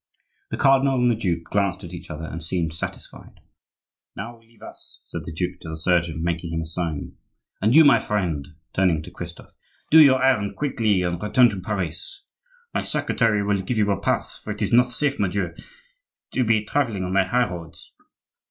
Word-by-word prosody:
The -, -, -3 dB
cardinal 135 Hz, 0 st, +4 dB
and 125 Hz, -1 st, +3 dB
the -, -, +1 dB
duke 85 Hz, -6 st, -1 dB
glanced 100 Hz, +1 st, -1 dB
at 85 Hz, 0 st, -9 dB
each 85 Hz, 0 st, -9 dB
other 75 Hz, +1 st, -6 dB
and 80 Hz, 0 st, -6 dB
seemed 80 Hz, -1 st, -2 dB
satisfied. 80 Hz, -, -8 dB, 0.8 s
"Now 115 Hz, 0 st, -7 dB
leave 115 Hz, 0 st, -22 dB
us," -, -, -2 dB
said -, -, -7 dB
the -, -, -6 dB
duke 90 Hz, +3 st, -3 dB
to 80 Hz, -, -9 dB
the 80 Hz, -, -5 dB
surgeon, 85 Hz, -1 st, +1 dB
making 85 Hz, 0 st, -2 dB
him 80 Hz, 0 st, -1 dB
a -, -, -4 dB
sign. 80 Hz, -2 st, -4 dB, 0.4 s
"And 110 Hz, +6 st, +3 dB
you 160 Hz, 0 st, +9 dB
my 145 Hz, -, +7 dB
friend," 85 Hz, -9 st, -2 dB, 0.3 s
turning 90 Hz, -5 st, +2 dB
to -, -, -10 dB
Christophe; 85 Hz, -1 st, -9 dB, 0.4 s
"do 160 Hz, -, +9 dB
your 130 Hz, -3 st, +6 dB
errand 105 Hz, -7 st, +2 dB
quickly 110 Hz, -10 st, +1 dB
and 85 Hz, -1 st, -2 dB
return 115 Hz, +3 st, +4 dB
to 95 Hz, -3 st, -5 dB
Paris. 100 Hz, -, -4 dB, 0.5 s
My -, -, 0 dB
secretary 110 Hz, -4 st, +1 dB
will 100 Hz, -1 st, +1 dB
give 110 Hz, +5 st, -2 dB
you 105 Hz, -1 st, +2 dB
a 100 Hz, -, -1 dB
pass, -, -, -1 dB
for -, -, -11 dB
it -, -, -3 dB
is -, -, -1 dB
not 125 Hz, +1 st, +6 dB
safe, 140 Hz, +3 st, -1 dB
mordieu, 95 Hz, -3 st, -1 dB, 0.8 s
to 130 Hz, -, +1 dB
be 110 Hz, -2 st, +2 dB
travelling 115 Hz, -6 st, 0 dB
on 90 Hz, 0 st, -3 dB
the 95 Hz, 0 st, +4 dB
high 125 Hz, +6 st, +2 dB
roads!" 85 Hz, -2 st, -10 dB
100 Hz, 195 wpm, -23 LUFS, 85-115 Hz, 0.8 s, you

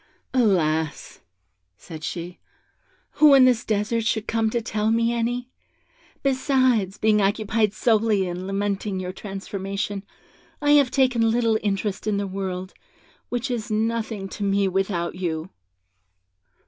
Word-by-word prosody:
'Alas!' 160 Hz, -, +1 dB, 0.6 s
said 160 Hz, -2 st, -10 dB
she, 175 Hz, +2 st, -5 dB, 0.7 s
'who 290 Hz, -1 st, +6 dB
in 265 Hz, -1 st, +7 dB
this 245 Hz, -2 st, +3 dB
desert 220 Hz, +2 st, 0 dB
should 220 Hz, -1 st, 0 dB
come 225 Hz, -1 st, +1 dB
to 235 Hz, -, 0 dB
tell 220 Hz, -1 st, -1 dB
me 230 Hz, +1 st, +2 dB
any? 245 Hz, +2 st, -2 dB, 0.7 s
Besides, 260 Hz, -7 st, +2 dB
being 215 Hz, -1 st, +3 dB
occupied 215 Hz, +1 st, +1 dB
solely 215 Hz, -5 st, +2 dB
in 180 Hz, +1 st, -5 dB
lamenting 200 Hz, 0 st, -2 dB
your 185 Hz, 0 st, -4 dB
transformation, 195 Hz, 0 st, -5 dB, 0.6 s
I 290 Hz, -1 st, +2 dB
have 285 Hz, -3 st, +6 dB
taken 250 Hz, -4 st, +2 dB
little 225 Hz, -1 st, +2 dB
interest 200 Hz, 0 st, -2 dB
in 210 Hz, -1 st, +1 dB
the 200 Hz, -, -1 dB
world, 190 Hz, -1 st, -4 dB, 0.6 s
which 245 Hz, +2 st, -2 dB
is 230 Hz, -3 st, -3 dB
nothing 220 Hz, -2 st, -1 dB
to 205 Hz, -, -6 dB
me 200 Hz, 0 st, +2 dB
without 185 Hz, -2 st, -1 dB
you.' 170 Hz, -1 st, -4 dB
210 Hz, 130 wpm, -24 LUFS, 195-230 Hz, 0.7 s, in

